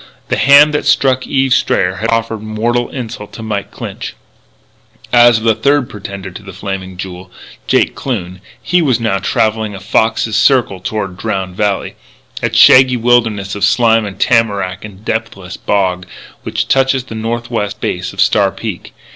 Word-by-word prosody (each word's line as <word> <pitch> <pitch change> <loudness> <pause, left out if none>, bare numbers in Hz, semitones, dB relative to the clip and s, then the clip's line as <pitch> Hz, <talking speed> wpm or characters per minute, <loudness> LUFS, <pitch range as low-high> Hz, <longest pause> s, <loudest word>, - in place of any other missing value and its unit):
The - - 0
hand 145 +2 +6
that 150 - -1
struck 130 -1 +2
Eve 135 -2 +1
Strayer 95 +1 +1
had 115 +4 -2
offered 115 -1 -1
mortal 115 +3 -1
insult 115 -5 -7
to 115 - -8
Mike 105 -2 -3
Clinch. - - -7 1.0
As 120 -1 +6
for 110 - -5
the 115 -1 +4
third 140 +2 +1
pretender 100 -2 -8
to 95 - -10
the 100 -1 -10
Flaming 95 -1 -6
Jewel, 90 0 -8 0.4
Jake - - +2
Kloon, 95 -8 -5 0.2
he 180 +1 +1
was 130 -7 +1
now 110 -4 0
travelling 110 +1 0
in - - -7
a - - -8
fox's 110 +1 0
circle 110 -3 +2
toward 95 -1 -4
Drowned 95 -3 -3
Valley 100 -1 -2 0.4
that - - -2
shaggy 130 -1 +7
wilderness 115 -4 +1
of 100 - -4
slime 115 +1 +3
and 100 -1 -9
tamarack 100 -6 +1
and 105 0 -12
depthless 95 -6 -4
bog 90 -3 -1 0.3
which - - -3
touches 135 -1 +2
the 125 - -10
northwest 115 -1 -3
base - - -3
of - - -14
Star - - +3
Peak. - - -7
110 Hz, 165 wpm, -14 LUFS, 100-120 Hz, 1.0 s, shaggy